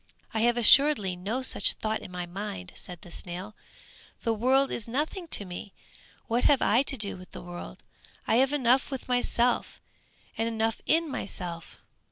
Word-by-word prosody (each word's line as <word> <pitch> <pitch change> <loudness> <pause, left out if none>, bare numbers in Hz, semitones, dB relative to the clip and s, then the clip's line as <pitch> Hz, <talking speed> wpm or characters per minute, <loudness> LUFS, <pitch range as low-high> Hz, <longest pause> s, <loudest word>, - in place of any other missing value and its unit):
"I 220 - 0
have 240 +2 +3
assuredly 240 -5 +6
no 210 +9 -3
such 210 - +3
thought 220 0 -2
in - - -10
my 180 -1 -5
mind," 175 - -6
said 175 -2 -8
the 175 - -13
snail, 180 +5 -6 0.7
"the 230 - +1
world 260 +5 +2
is 230 - -4
nothing 310 - -2
to 205 - 0
me! 180 +2 -8 0.5
What 240 +1 0
have 285 -3 +5
I 235 +4 +4
to 275 0 -3
do 205 -3 +1
with 185 0 -14
the - - -8
world? 175 0 -9 0.4
I 225 - +2
have 265 +2 +3
enough 260 -2 +2
with 270 -2 -6
myself, 245 -1 0 0.6
and 225 - +1
enough 225 -1 -1
in 330 +1 +3
myself!" 175 - -6
225 Hz, 175 wpm, -28 LUFS, 185-260 Hz, 0.7 s, assuredly